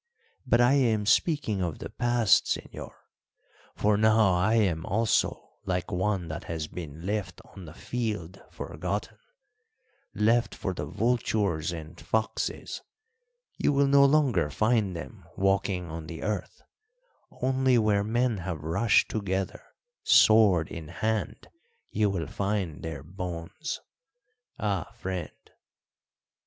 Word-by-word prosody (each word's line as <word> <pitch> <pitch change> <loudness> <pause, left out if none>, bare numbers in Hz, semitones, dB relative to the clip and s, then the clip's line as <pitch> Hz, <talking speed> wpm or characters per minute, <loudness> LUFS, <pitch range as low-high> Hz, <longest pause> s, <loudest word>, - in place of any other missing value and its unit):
But 120 - +4
I 120 +2 +5
am 115 -7 +2
speaking 115 - +2
of 85 -4 -2
the - - -8
past, 120 -3 +3
señor; - - -4 0.9
for 105 0 +2
now 110 -2 +4
I 95 +6 +2
am 90 -8 +2
also 110 +6 0
like 90 -1 -2
one 95 -1 0
that 80 +1 -6
has 80 -2 -3
been 80 0 -8
left 100 -4 -3
on 95 -3 -10
the 80 - -10
field 105 -7 -4
forgotten - - -5 1.0
left 115 +4 +2
for 95 - -3
the 75 -4 -5
vultures 100 -5 0
and 80 -2 -8
foxes. 110 0 -2 0.8
You 145 - +2
will 140 0 +4
no 140 0 +6
longer 135 - +3
find 110 +3 +1
them 65 -6 -8
walking 95 -1 +1
on 80 -1 -6
the 80 -1 -7
earth; 105 -2 -4 0.8
only 130 0 +2
where 105 -3 +2
men 120 0 0
have 85 -4 -5
rushed 90 +8 +3
together 95 -3 -2 0.4
sword 100 -7 +5
in 80 -2 -7
hand 110 +5 -2 0.4
you 105 -1 +2
will 90 -4 -2
find 95 -1 -2
their 80 -4 -6
bones. 90 - -5 0.8
Ah, 100 -5 -2
friend!" 90 -3 -4
100 Hz, 125 wpm, -28 LUFS, 85-110 Hz, 1.0 s, no